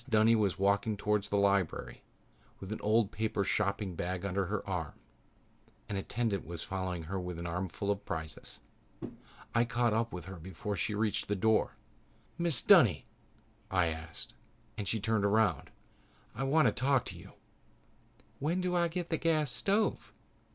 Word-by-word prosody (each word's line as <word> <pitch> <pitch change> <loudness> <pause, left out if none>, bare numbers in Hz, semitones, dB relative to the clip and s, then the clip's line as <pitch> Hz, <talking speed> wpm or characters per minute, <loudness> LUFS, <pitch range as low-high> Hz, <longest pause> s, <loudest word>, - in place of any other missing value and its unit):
Dunny 110 0 +5
was 100 -5 +1
walking 100 +2 +2
towards 105 0 0
the 100 - +1
lobby 100 -3 +1 0.6
with 95 +1 -8
an 110 - -4
old 110 0 +2
paper 110 -2 -1
shopping 100 0 0
bag 90 +2 -3
under 100 0 0
her 105 0 -3
arm. 90 -6 -3 0.9
An 100 - -3
attendant 100 0 -1
was 85 0 -6
following 95 -3 -3
her 95 +4 -3
with 90 -1 -5
an 85 - -5
armful 90 +3 -2
of 100 0 -3
prizes. 80 -1 -6 0.9
I 115 - +4
caught 120 -1 +1
up 115 +1 0
with 90 -2 -6
her 95 -1 -8
before 95 +4 -5
she 100 +4 -1
reached 105 0 0
the 105 - 0
door. 110 +3 +2 0.6
"Mrs. 170 -8 +2
Dunny," - - +6 0.6
I 90 -3 +2 0.2
said, - - -7 0.4
and 100 - -4
she 110 - 0
turned 110 0 +1
around. 100 -6 +2 0.6
"I 135 +5 -2
want 155 +3 +4
to - - +4
talk 135 -1 +2
to - - -5
you." - - -12 1.1
"When 160 +6 0
do 180 -1 0
I 170 -1 +3
get 175 +1 -4
the 160 - +2
gas 155 -5 +2
stove?" 205 - 0
105 Hz, 165 wpm, -32 LUFS, 95-115 Hz, 1.1 s, Dunny